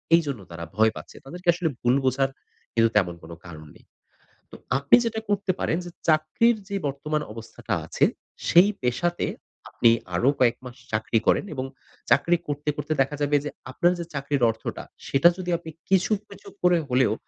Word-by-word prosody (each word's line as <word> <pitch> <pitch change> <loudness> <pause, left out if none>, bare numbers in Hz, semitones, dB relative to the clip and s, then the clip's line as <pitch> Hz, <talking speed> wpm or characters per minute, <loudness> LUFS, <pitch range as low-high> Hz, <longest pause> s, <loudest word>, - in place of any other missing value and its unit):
এইজন্য 145 -8 0
তারা 85 0 -7
ভয় 110 +1 +4
পাচ্ছে। - - -10
তাদেরকে 175 +6 -10
আসলে 170 -1 -1
ভুল 120 +1 +3
বোঝার 135 +1 +2 0.4
কিন্তু 115 0 +4
তেমন 90 -4 +3
কোন 80 - -11
কারণ 80 -3 -10
নেই। - - -20 0.7
তো - - -10 0.2
আপনি 140 +1 +5
যেটা 225 -1 -1
করতে 200 -1 +1
পারেন 165 - 0
যে, - - -6 0.2
চাকরির 155 +9 +3
যে 200 - -3
বর্তমান 150 +2 -2
অবস্থাটা 115 0 -6
আছে - - +2 0.4
সেই 180 +4 +6
পেশাতে 170 +8 0 0.4
আপনি 115 - +3 0.3
আরো 120 +9 +3
কয়েক 120 -2 +4
মাস 125 -1 -9 0.2
চাকরি 110 +1 +1
করেন - - +3
এবং 130 -2 -3 0.5
চাকরি 170 +7 +4
করতে, 145 0 -3
করতে 150 +1 -2
দেখা 135 +2 0
যাবে 145 0 +2
যে, 150 - -3 0.2
আপনার 175 +7 +2
যে 170 - -4
চাকরির 140 -2 -1
অর্থটা, 110 - -6 0.2
সেটা 140 +5 +5
যদি 180 -1 -5
আপনি 165 -1 -10 0.2
কিছু, 190 -1 +3 0.2
কিছু 200 -1 -14
করে 180 -1 +4
হলেও 125 -2 +3
145 Hz, 175 wpm, -25 LUFS, 125-175 Hz, 0.7 s, সেই